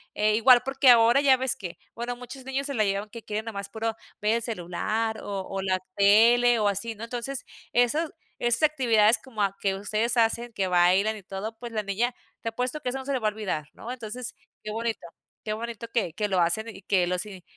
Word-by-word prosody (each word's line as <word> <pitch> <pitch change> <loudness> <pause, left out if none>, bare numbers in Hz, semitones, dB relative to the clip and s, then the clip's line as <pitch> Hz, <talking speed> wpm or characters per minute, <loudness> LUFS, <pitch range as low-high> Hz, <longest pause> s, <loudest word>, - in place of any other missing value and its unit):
e 210 0 +2
igual 240 +2 +7
porque 270 0 +3
ahora 235 +2 +7
ya 270 -2 +5
ves 260 -1 0
que 175 -3 -8 0.2
bueno 240 +1 -4
muchos 250 +2 -10
niños 265 +1 -2
se 280 - -3
la 220 -5 +2
llevan 200 +1 -1
que 230 +2 -9
quieren 215 +1 -4
nada 225 - -5
más 200 0 -5
puro 225 +1 -3 0.3
ver 210 +2 +2
el - - -4
celular, 220 +2 -2
o 200 -1 -4
o 195 0 -3
la 190 -1 +1 0.2
tele, 230 +4 +5
o 210 - +2
así, 205 +3 -2
¿no? 215 - -9
Entonces 245 +3 -4 0.3
esos 270 +7 +2 0.3
esas 240 +5 +1
actividades 235 -7 +4
como 230 -5 -6
a 200 -1 0
que 195 -1 +1
ustedes 215 +4 -1
hacen, 235 +1 +1
que 195 -4 -1
bailan 185 +4 +3
y 210 - -11
todo, 195 +4 -6
pues, 240 -1 -7
la 215 -1 -2
niña 215 +5 -1 0.3
te 230 - -2
apuesto 250 +6 -3
que 250 - -2
eso 255 - -3
no 265 - -7
se 280 - -1
le 260 - 0
va 220 - 0
a - - -6
olvidar, 190 -9 -4
¿no? 235 - -8
Entonces 245 0 -6 0.3
qué 215 - -5
bonito 225 -4 -3 0.4
qué 215 - -1
bonito 230 +1 -5
que 205 -9 0
que 210 +3 -1
lo 190 -2 +1
hacen, 175 +7 +1
y 195 - -11
que 185 -2 +2
los 180 +2 -1
y 190 -3 -10
225 Hz, 230 wpm, -26 LUFS, 200-245 Hz, 0.4 s, igual